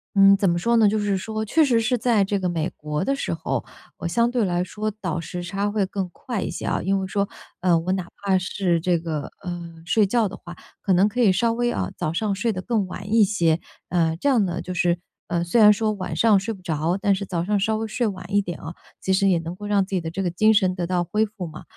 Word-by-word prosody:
嗯， 195 Hz, 0 st, +7 dB
怎 195 Hz, -, +1 dB
么 170 Hz, 0 st, +1 dB
说 235 Hz, +5 st, +2 dB
呢， 220 Hz, -2 st, +6 dB
就 215 Hz, +1 st, +1 dB
是 205 Hz, -2 st, 0 dB
说 220 Hz, +3 st, -3 dB
确 310 Hz, +9 st, +3 dB
实 240 Hz, -4 st, +3 dB
是 245 Hz, +2 st, +1 dB
在 225 Hz, -3 st, +3 dB
这 200 Hz, +1 st, -1 dB
个 185 Hz, -, -1 dB
美 165 Hz, -1 st, -1 dB
国 150 Hz, +1 st, -3 dB
的 275 Hz, +7 st, 0 dB
时 -, -, -2 dB
候， -, -, -3 dB, 0.3 s
我 175 Hz, -, -4 dB
相 235 Hz, +8 st, +2 dB
对 240 Hz, -3 st, +1 dB
来 175 Hz, -1 st, 0 dB
说 210 Hz, +4 st, -3 dB
倒 170 Hz, -3 st, -2 dB
时 175 Hz, +2 st, -5 dB
差 200 Hz, +4 st, -2 dB
会 205 Hz, -2 st, +1 dB
更 195 Hz, -1 st, -3 dB
快 235 Hz, -2 st, -4 dB
一 -, -, -3 dB
些 -, -, -6 dB
啊， -, -, 0 dB
因 195 Hz, +1 st, +1 dB
为 190 Hz, -, -3 dB
说， 200 Hz, +1 st, 0 dB, 0.3 s
呃， 180 Hz, -2 st, +4 dB
我 175 Hz, +3 st, -2 dB
哪 185 Hz, -2 st, -2 dB, 0.2 s
怕 195 Hz, -2 st, +2 dB
是 180 Hz, -1 st, 0 dB
这 175 Hz, 0 st, +1 dB
个， 155 Hz, -3 st, -3 dB, 0.2 s
呃， 175 Hz, -2 st, -6 dB
睡 215 Hz, +3 st, +3 dB
觉 225 Hz, +2 st, +2 dB
的 195 Hz, -, -9 dB
话， 175 Hz, 0 st, -10 dB, 0.3 s
可 195 Hz, -, +2 dB
能 190 Hz, +4 st, +4 dB
可 245 Hz, -, -5 dB
以 225 Hz, -5 st, +5 dB
稍 230 Hz, +4 st, +2 dB
微 240 Hz, +1 st, 0 dB
啊， 90 Hz, -1 st, -2 dB
早 155 Hz, -, -2 dB
上 200 Hz, +2 st, 0 dB
睡 225 Hz, +3 st, 0 dB
得 185 Hz, -, -4 dB
更 220 Hz, -2 st, 0 dB
晚 195 Hz, +3 st, -8 dB
一 225 Hz, -1 st, +6 dB
些， 170 Hz, -5 st, +2 dB, 0.3 s
呃， 165 Hz, -2 st, +1 dB
这 280 Hz, -, +1 dB
样 235 Hz, -7 st, +3 dB
呢 175 Hz, -1 st, -3 dB
就 185 Hz, -, -7 dB
是， 175 Hz, -1 st, +1 dB, 0.3 s
呃， 170 Hz, 0 st, 0 dB
虽 175 Hz, +7 st, +1 dB
然 210 Hz, -1 st, +8 dB
说 215 Hz, +1 st, 0 dB
晚 185 Hz, -5 st, -5 dB
上 210 Hz, +3 st, +4 dB
睡 200 Hz, +4 st, -3 dB
不 190 Hz, -, -13 dB
着， 165 Hz, 0 st, -1 dB
但 200 Hz, -2 st, +3 dB
是 200 Hz, -, -4 dB
早 175 Hz, -3 st, -2 dB
上 205 Hz, +2 st, +1 dB
稍 220 Hz, +2 st, +1 dB
微 225 Hz, 0 st, -3 dB
睡 240 Hz, +3 st, -1 dB
晚 195 Hz, -4 st, -5 dB
一 205 Hz, -, +4 dB
点 175 Hz, -4 st, -6 dB
啊， 165 Hz, +2 st, -8 dB, 0.3 s
其 190 Hz, -, -1 dB
实 195 Hz, +1 st, +3 dB
也 175 Hz, -3 st, +3 dB
能 165 Hz, +1 st, -6 dB
够 205 Hz, -, -9 dB
让 205 Hz, -1 st, +2 dB
自 190 Hz, -, -11 dB
己 185 Hz, -, +2 dB
的 160 Hz, 0 st, -5 dB
这 195 Hz, -, -3 dB
个 180 Hz, -, 0 dB
精 215 Hz, +6 st, +4 dB
神 185 Hz, -3 st, +2 dB
得 175 Hz, -2 st, -2 dB
到 180 Hz, 0 st, 0 dB
恢 210 Hz, +6 st, +1 dB
复 200 Hz, -5 st, -7 dB
嘛。 155 Hz, -, -10 dB
195 Hz, 295 characters per minute, -23 LUFS, 175-215 Hz, 0.3 s, 然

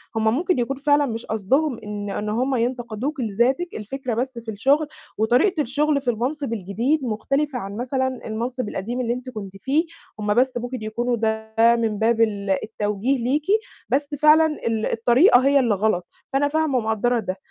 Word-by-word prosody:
هُم 220 Hz, -, 0 dB
ممكن 345 Hz, 0 st, +1 dB
يكون 260 Hz, +3 st, -1 dB
فعلًا 290 Hz, +1 st, +3 dB
مش 230 Hz, -3 st, -4 dB
قصدهم 240 Hz, +6 st, 0 dB
إن 205 Hz, -1 st, -5 dB
إن 210 Hz, +2 st, -3 dB
هُم 255 Hz, +5 st, 0 dB
ينتقدوكِ 245 Hz, +3 st, -2 dB
لذاتِك، 245 Hz, -, 0 dB
الفكرة 245 Hz, +3 st, -4 dB
بس 250 Hz, +1 st, -2 dB
في 230 Hz, -1 st, -6 dB
الشغل، 275 Hz, +9 st, +2 dB, 0.3 s
وطريقة 260 Hz, -, +3 dB
الشغل 290 Hz, +3 st, +1 dB
في 260 Hz, -, -1 dB
المنصب 250 Hz, +3 st, -2 dB
الجديد 230 Hz, -, -1 dB
مختلفة 265 Hz, +4 st, -1 dB
عن 200 Hz, 0 st, -6 dB
مثلًا 260 Hz, 0 st, -1 dB
المنصب 235 Hz, +2 st, -3 dB
القديم 235 Hz, +7 st, -3 dB
اللي 240 Hz, -1 st, 0 dB
أنتِ 250 Hz, +1 st, -6 dB
كنتِ 205 Hz, -6 st, -7 dB
فيه، 295 Hz, +5 st, +1 dB, 0.3 s
هُم 210 Hz, 0 st, +1 dB
بس 255 Hz, +3 st, +3 dB
ممكن 245 Hz, 0 st, -5 dB
يكونوا 240 Hz, +3 st, -1 dB
ده 220 Hz, 0 st, -2 dB, 0.2 s
من 225 Hz, -3 st, -1 dB
باب 225 Hz, +1 st, +2 dB
ال 205 Hz, -3 st, 0 dB
التوجيه 215 Hz, +4 st, -1 dB
ليكِ، 285 Hz, +5 st, 0 dB, 0.4 s
بس 285 Hz, +2 st, +1 dB
فعلًا 305 Hz, +2 st, +6 dB, 0.2 s
ال 225 Hz, -1 st, 0 dB
الطريقة 245 Hz, -, +5 dB
هي 280 Hz, 0 st, +5 dB
اللي 235 Hz, -6 st, +2 dB
غلط، 190 Hz, -3 st, 0 dB, 0.3 s
فأنا 280 Hz, +1 st, +3 dB
فاهمة 310 Hz, -3 st, +1 dB
ومقدّرة 225 Hz, +2 st, +1 dB
ده، 190 Hz, -4 st, -3 dB
240 Hz, 170 wpm, -23 LUFS, 220-275 Hz, 0.4 s, فعلًا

